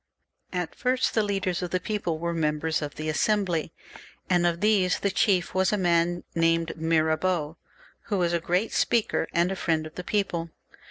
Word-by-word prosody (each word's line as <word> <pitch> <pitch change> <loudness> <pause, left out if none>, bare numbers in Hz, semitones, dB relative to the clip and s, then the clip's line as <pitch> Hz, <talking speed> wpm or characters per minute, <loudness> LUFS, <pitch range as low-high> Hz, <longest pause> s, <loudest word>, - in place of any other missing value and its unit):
At 180 -2 -3
first 255 +1 0
the 220 - +3
leaders 195 -3 -1
of 180 - -3
the 185 - 0
people 200 -6 -2
were 170 +1 -2
members 155 0 0
of 145 -1 -5
the 155 +1 -5
Assembly, 175 -1 0 0.6
and 175 -1 +4
of 170 -1 -1
these 200 -3 +2
the 200 - +1
chief 190 -2 +1
was 190 0 +2
a 210 - +1
man 175 -1 +1
named 165 0 +1
Mira 160 -1 +2
beau, 165 -3 -1 0.5
who 205 - -1
was 175 -2 +1
a 170 - +2
great 180 +6 0
speaker 225 -7 +1
and 170 +2 +2
a - - -2
friend 160 -3 0
of 155 - -9
the 180 - -6
people. 180 -5 -1
175 Hz, 185 wpm, -26 LUFS, 165-190 Hz, 0.6 s, and